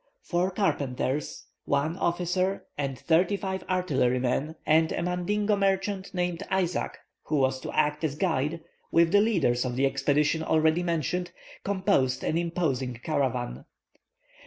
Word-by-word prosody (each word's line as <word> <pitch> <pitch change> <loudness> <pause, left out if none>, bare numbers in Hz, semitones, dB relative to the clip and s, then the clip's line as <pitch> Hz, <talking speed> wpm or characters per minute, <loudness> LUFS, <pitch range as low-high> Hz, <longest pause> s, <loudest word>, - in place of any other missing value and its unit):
Four 175 +1 0
carpenters, 145 -7 -1 0.2
one 145 +4 0
officer 180 +2 0
and 135 -2 -3
thirty 175 - +2
five 190 -1 -4
artillery 145 -9 +1
men, 135 +5 -1
and 160 +1 +4
a - - -1
Mandingo 205 +4 0
merchant 195 0 0
named 180 -2 -2
Isaac, 185 -2 -1 0.3
who 155 - -1
was 130 -1 +2
to - - -6
act 150 +2 +1
as 150 -3 0
guide, 160 -1 0 0.3
with 165 0 +4
the 205 +1 +6
leaders 170 - +2
of 125 -2 -3
the 135 +2 +2
expedition 145 +3 +1
already 160 +1 +2
mentioned, 175 +1 -1 0.3
composed 190 -10 +1
an - - 0
imposing 160 -7 -1
caravan. 125 - -1
165 Hz, 135 wpm, -27 LUFS, 140-185 Hz, 0.3 s, the